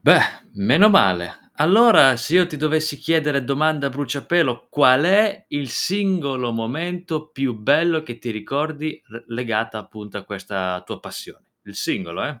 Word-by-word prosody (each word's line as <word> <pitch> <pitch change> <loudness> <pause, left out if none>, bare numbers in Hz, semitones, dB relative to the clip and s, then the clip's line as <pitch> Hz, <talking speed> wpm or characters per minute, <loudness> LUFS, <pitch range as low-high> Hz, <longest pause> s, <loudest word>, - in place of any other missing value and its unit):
Beh, - - +7 0.4
meno 125 - +4
male. 90 - +2
Allora, 175 - +6
se 140 +7 -3
io 180 0 +5
ti 155 - -8
dovessi 155 0 -1
chiedere 150 -3 0
domanda 145 +2 0
a - - -2
bruciapelo, 140 0 -1
qual 140 0 +4
è 205 +2 +2
il 145 -3 -4
singolo 165 - -1
momento 155 +7 -4
più 135 -2 -3
bello 155 +9 +1
che 120 -6 -10
ti 120 - -6
ricordi 150 +8 -4
le 115 +1 -12
legata, 115 -2 -3
appunto 105 -1 -10
a 100 - -11
questa 95 -2 -5
tua - - -9
passione. - - -11 0.2
Il 100 - -15
singolo 90 -4 -4
eh! 145 -5 -6
140 Hz, 155 wpm, -21 LUFS, 115-160 Hz, 0.4 s, Beh